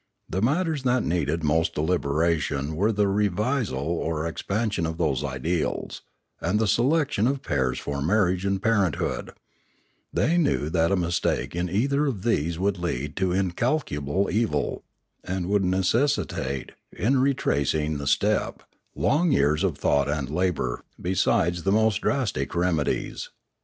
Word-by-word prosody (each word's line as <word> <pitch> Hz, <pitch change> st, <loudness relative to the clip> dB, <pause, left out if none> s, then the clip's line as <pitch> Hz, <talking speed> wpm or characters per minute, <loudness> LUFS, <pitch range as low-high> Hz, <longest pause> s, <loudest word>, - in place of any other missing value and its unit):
The 95 Hz, -, -2 dB
matters 155 Hz, -, +1 dB
that 125 Hz, -1 st, +1 dB
needed 85 Hz, -1 st, -1 dB
most 80 Hz, +2 st, +1 dB
deliberation 75 Hz, -2 st, 0 dB
were 100 Hz, +7 st, +2 dB
the 105 Hz, -1 st, +1 dB
revisal 105 Hz, -, 0 dB
or 80 Hz, -1 st, -1 dB
ex 85 Hz, -, -4 dB
pansion 105 Hz, -5 st, -1 dB
of 80 Hz, 0 st, -4 dB
those 75 Hz, -5 st, 0 dB
ideals, 75 Hz, +5 st, -2 dB, 0.4 s
and 90 Hz, +5 st, +1 dB
the 110 Hz, -, +2 dB
selection 135 Hz, 0 st, +2 dB
of 135 Hz, +1 st, -1 dB
pairs 65 Hz, -2 st, 0 dB
for 70 Hz, -1 st, -4 dB
marriage 90 Hz, +2 st, +2 dB
and 100 Hz, -1 st, 0 dB
parenthood; 100 Hz, -7 st, 0 dB, 0.8 s
they 170 Hz, +3 st, +2 dB
knew 110 Hz, -, +1 dB
that 85 Hz, 0 st, +2 dB
a -, -, +4 dB
mistake 85 Hz, -2 st, -1 dB
in 90 Hz, +1 st, -1 dB
either 140 Hz, -, +1 dB
of 110 Hz, -9 st, -3 dB
these 85 Hz, -8 st, 0 dB
would 95 Hz, +1 st, 0 dB
lead 75 Hz, -4 st, -3 dB
to 95 Hz, -1 st, +1 dB
incalculable 95 Hz, -, 0 dB
evil, 110 Hz, +4 st, -1 dB, 0.4 s
and 95 Hz, -1 st, -3 dB
would 100 Hz, -1 st, +2 dB
necessitate, 95 Hz, -, 0 dB, 0.2 s
in 130 Hz, +8 st, +1 dB
retracing 75 Hz, -, +1 dB
the 70 Hz, -, -5 dB
step, -, -, +1 dB, 0.3 s
long 160 Hz, +3 st, +2 dB
years 75 Hz, -, +2 dB
of 90 Hz, -7 st, 0 dB
thought 70 Hz, 0 st, +1 dB
and 70 Hz, -2 st, -2 dB
labour 85 Hz, -8 st, -1 dB, 0.2 s
besides 85 Hz, -1 st, +1 dB
the 95 Hz, -, 0 dB
most 110 Hz, -1 st, +2 dB
drastic 90 Hz, -, -1 dB
remedies. 85 Hz, -4 st, -1 dB
90 Hz, 140 wpm, -25 LUFS, 75-110 Hz, 0.8 s, a